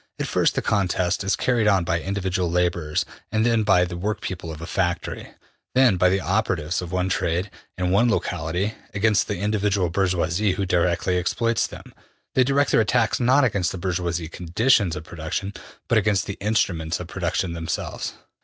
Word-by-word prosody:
At - - -2
first - - +1
the - - -1
contest 95 -2 0
is 95 - +1
carried 120 -4 +1
on 95 -4 +4
by 85 0 -1
individual 95 -2 -1
laborers, 85 -3 0 0.3
then 110 +1 +2
by 100 -4 +4
the 90 -1 -6
workpeople 90 -2 -4
of 80 - -8
a 85 - -6
factory, 85 -1 -2 0.5
then 125 -7 +5
by 90 +1 +4
the 95 +1 +1
operatives 90 -5 0
of 90 -1 -7
one 90 0 0
trade, 90 +1 -1 0.3
in 90 0 0
one 110 +6 +4
locality, 90 0 -1 0.2
against 105 -1 +2
the 105 - -2
individual 100 -3 0
bourgeois 90 -2 +1
who 100 +1 0
directly 90 0 +1
exploits 115 +6 0
them. - - -12 0.4
They 130 - +4
direct 140 +2 +2
their - - +5
attacks 115 +2 +1
not 130 +3 +4
against 100 -7 +1
the - - -5
bourgeois 85 -2 -2
conditions 90 +1 +2
of 75 - -6
production, 85 +5 -4 0.3
but 115 - +4
against 100 -2 +1
the 100 - -5
instruments 90 -6 0
of 90 - -5
production 85 0 -2
themselves.'' 85 -1 -4
95 Hz, 170 wpm, -23 LUFS, 85-105 Hz, 0.5 s, then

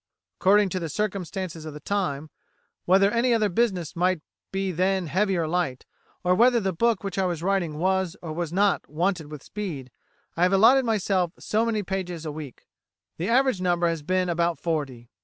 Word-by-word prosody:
According 205 +1 +4
to 185 - -2
the 165 -2 -4
circumstances 185 -3 -3
of 155 -2 -8
the - - -7
time, 155 -6 -2 0.5
whether 195 +3 +4
any 235 +1 +2
other 215 -2 +2
business 185 -5 0
might 180 0 +1 0.3
be 195 0 -1
then 185 +2 +1
heavy 190 +4 +1
or 165 -2 0
light, 155 -6 -2 0.4
or 180 0 +3
whether 235 +5 +5
the 190 -3 -1
book 225 +4 +1
which 195 -1 -3
I 190 - +2
was 170 -2 -3
writing 180 -5 0
was, 190 +1 0
or 160 -3 -6
was 170 -1 -3
not, 200 +3 +1
wanted 165 0 -1
with 150 -3 -8
speed, 160 -12 -6 0.4
I 170 - -3
have 180 +2 +4
allotted 245 +7 +6
myself 190 -5 0
so 220 +2 0
many 215 -2 0
pages 180 -3 -4
a 155 - -3
week. 145 -4 -9 0.5
The 175 +6 -2
average 255 -4 +3
number 175 -1 +2
has 165 -2 -2
been 185 +4 0
about 170 -1 0
forty. 140 -8 -3
185 Hz, 190 wpm, -25 LUFS, 165-200 Hz, 0.5 s, allotted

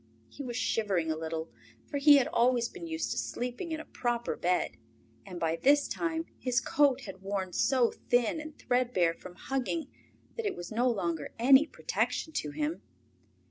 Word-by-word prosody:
He - - -9
was 245 -3 -5
shivering 195 -9 0
a - - 0
little, 160 0 -4 0.3
for 285 - -3
he 290 0 +8
had 270 - +2
always 240 0 +3
been 345 +2 -9
used 320 0 -2
to - - -1
sleeping 250 +8 -4
in 315 - -2
a - - -8
proper 240 -1 -2
bed, 180 +1 0 0.5
and 180 -2 -7
by 165 0 0
this 285 +6 +4
time 330 -1 -2
his 250 -2 +1
coat 275 +1 +2
had 195 -5 -9
worn 195 -2 -3
so 255 -4 +3 0.2
thin 245 +5 +2
and 310 0 -10
threadbare 240 -9 +1
from 180 +1 -12
hugging 270 - -3 0.5
that 460 - -3
it - - -2
was 175 +3 -8
no 240 +3 +2
longer 170 -9 -2
any 270 +5 +6
protection 320 - -2
to 150 - -2
him. 300 - -3
245 Hz, 180 wpm, -30 LUFS, 185-290 Hz, 0.5 s, he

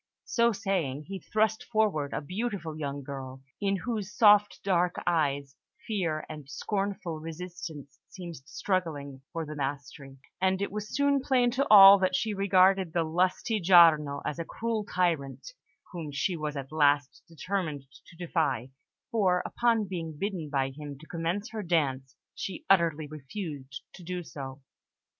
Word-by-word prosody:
So 235 -1 +2
saying, 185 - -2
he 190 +5 -7
thrust 220 +4 0
forward 210 - 0
a - - -3
beautiful 185 -1 -4
young 140 -2 -4
girl, 135 -1 -8 0.2
in 200 -1 +1
whose 210 -1 -3
soft 210 -2 +5
dark 180 -2 +1
eyes 140 -5 0 0.3
fear 170 -8 -2
and 150 -3 -9
scornful 195 -3 -3
resistance 160 -3 -8
seemed 175 -4 -8
struggling 150 -2 -3
for 165 -2 -3
the 155 - -7
mastery; 140 -1 -5 0.2
and 190 0 +2
it 200 - -2
was 210 +1 -5
soon 280 0 +2
plain 250 -2 +2
to 270 +3 0
all 200 -1 +10
that 185 -1 +1
she 220 -1 0
regarded 190 -2 +3
the 170 - +2
lusty 180 +6 0
Giarno 160 -5 +6
as 150 - -3
a - - -1
cruel 225 +3 -3
tyrant, 170 - -1 0.4
whom 165 -5 -6
she 150 +6 -1
was 150 -2 -4
at 135 0 -6
last 145 -2 +2
determined 165 -3 -3 0.2
to - - -16
defy, 150 -8 -1 0.4
for, 190 -6 +2
upon 230 -3 +1
being 165 -5 -5
bidden 180 -4 -3
by 135 -2 0
him 145 0 -8
to 155 - -14
commence 175 +7 -3
her 220 -2 -4
dance, 140 -7 -1 0.2
she 190 -3 -6
utterly 165 -5 +3
refused 145 -2 -7
to - - -12
do 180 +1 -4
so. 135 -3 -8
170 Hz, 150 wpm, -29 LUFS, 145-195 Hz, 0.4 s, all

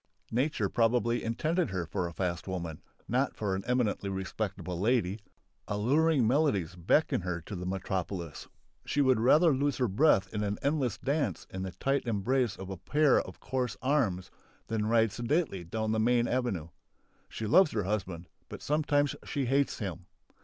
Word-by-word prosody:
Nature 125 -3 +1
probably 120 +2 +1
intended 155 +9 0
her 95 -3 -2
for 85 +2 -2
a - - -6
fast 85 0 -3
woman, 85 -4 -4 0.3
not 130 +3 0
for 100 -3 -2
an 95 +1 -2
eminently 120 -5 0
respectable 95 -2 -4
lady. 105 -2 +1 0.5
Alluring 135 +6 +2
melodies 110 - +1
beckon 90 - +2
her 90 -1 -3
to 100 - -7
the 90 0 -5
metropolis. 95 -3 -4 0.4
She - - -2
would 130 -4 +4
rather 150 +7 +5
lose 140 0 0
her 125 - +1
breath 100 -2 +3
in 105 - -1
an 105 0 -1
endless 140 -6 0
dance 140 +3 -1
in 95 - -5
the 95 0 -4
tight 135 +8 -1
embrace 120 +2 +1
of 95 0 -8
a 95 - -5
pair 145 - +3
of - - -11
coarse 125 -6 -2
arms 110 -10 +1 0.4
than 110 -1 0
ride 115 -1 +3
sedately 120 - -1
down 110 +5 -2
the 110 - +1
main 120 +1 +3
avenue. 110 -11 -1 0.6
She 110 - -5
loves 160 - +6
her 105 - 0
husband, 90 -4 -3 0.2
but - - -8
sometimes 145 -1 +1
she 140 -2 -2
hates 140 +3 +1
him. 95 -4 -5
110 Hz, 165 wpm, -30 LUFS, 95-135 Hz, 0.6 s, loves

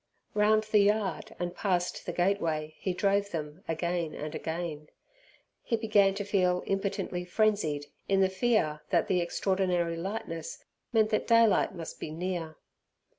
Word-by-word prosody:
Round 215 +1 +4
the 215 0 +3
yard 210 +1 +1
and 175 0 -3
past 180 -3 -1
the - - 0
gateway 165 -5 0
he 190 - -1
drove 200 +2 +1
them 155 0 -5
again 170 0 -1
and 150 +1 -5
again. 160 -2 -4 0.7
He 230 - 0
began 205 -3 +3
to 205 - -2
feel 185 -3 +1
impotently 195 -2 -2
frenzied 180 -7 +1 0.2
in 195 0 +3
the 190 - +5
fear 190 -6 +1
that - - +2
the 180 -2 +2
extraordinary 175 -1 0
lightness 165 -3 -5 0.3
meant 220 -2 +3
that 215 - 0
daylight 230 -5 +4
must 165 -2 -7
be - - -5
near. 165 -1 -4
185 Hz, 145 wpm, -29 LUFS, 165-205 Hz, 0.7 s, the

